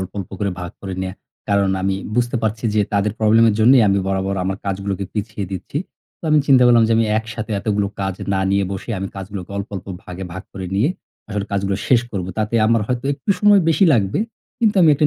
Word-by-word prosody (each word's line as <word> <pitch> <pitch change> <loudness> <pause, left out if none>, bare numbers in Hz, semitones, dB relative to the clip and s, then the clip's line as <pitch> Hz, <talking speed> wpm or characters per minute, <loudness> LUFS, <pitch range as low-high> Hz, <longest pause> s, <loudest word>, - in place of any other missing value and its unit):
অল্প, 95 - -4
অল্প 95 - -6
করে 100 -1 0
ভাগ 90 0 -5
করে 95 -1 -5
নেয়া। 95 0 -4 0.3
কারণ 100 -1 +2
আমি 95 0 +1 0.2
বুঝতে 120 +1 +1
পারছি 110 +1 -2
যে 105 - +3
তাদের 100 0 +1
প্রবলেমের 110 0 +4
জন্যই 125 +2 +7
আমি 100 0 +3
বরাবর 95 0 -1
আমার 95 +1 -1
কাজগুলোকে 100 0 -2
পিছিয়ে 105 -1 -3
দিচ্ছি। 95 +9 -4 0.4
তো - - -71
আমি 155 - +5
চিন্তা 130 -2 +6
করলাম 120 -1 +6
যে - - +3
আমি 115 - +3
একসাথে 110 0 -6
এতগুলো 105 -1 0
কাজ 95 -1 -1 0.2
না 95 - +1
নিয়ে 100 0 +2
বসে, 95 +5 -6
আমি 95 0 -3
কাজগুলোকে 95 -1 -7
অল্প, 100 0 -4
অল্প 95 - -8 0.2
ভাগে 90 +1 -7
ভাগ 95 +1 -6
করে 95 -2 -6
নিয়ে, 110 +9 +3 0.4
আসলে 105 -2 -2
কাজগুলো 100 0 0
শেষ 125 -3 +5
করবো। 95 -3 -4
তাতে 110 +1 -1
আমার 115 0 +3
হয়তো 125 0 -2
একটু 140 +8 -3
সময় 205 -2 +6
বেশি 165 +4 +4
লাগবে। 100 -6 +1 0.4
কিন্তু 220 -3 +2
আমি 165 - +6
একটা 150 +2 +3
100 Hz, 215 wpm, -20 LUFS, 95-115 Hz, 0.4 s, জন্যই